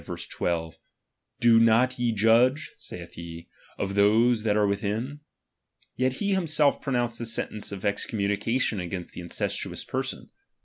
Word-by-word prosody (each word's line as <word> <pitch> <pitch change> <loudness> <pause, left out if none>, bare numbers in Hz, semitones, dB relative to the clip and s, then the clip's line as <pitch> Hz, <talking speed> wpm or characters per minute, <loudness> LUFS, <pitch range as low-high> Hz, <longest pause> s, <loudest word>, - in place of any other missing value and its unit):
12): 80 -2 -3 0.6
Do 115 -1 +6
not 115 +3 +4
ye 120 -1 +1
judge, 115 +7 +3
saith 85 -1 -9
he, 85 0 -9 0.3
of 100 0 -2
those 110 +4 +4
that 105 -1 +1
are 105 - +3
within? 105 +8 -2 0.8
Yet 130 0 +1
he 200 +8 -1
himself 155 -6 +2
pronounced 120 -4 -1
the 120 - -3
sentence 110 -2 -2
of 100 -2 -7
excom 100 0 -1
munication 105 0 0
against 90 0 -6
the - - -7
incestuous 85 - -3
person. - - -4
110 Hz, 140 wpm, -26 LUFS, 100-125 Hz, 0.8 s, Do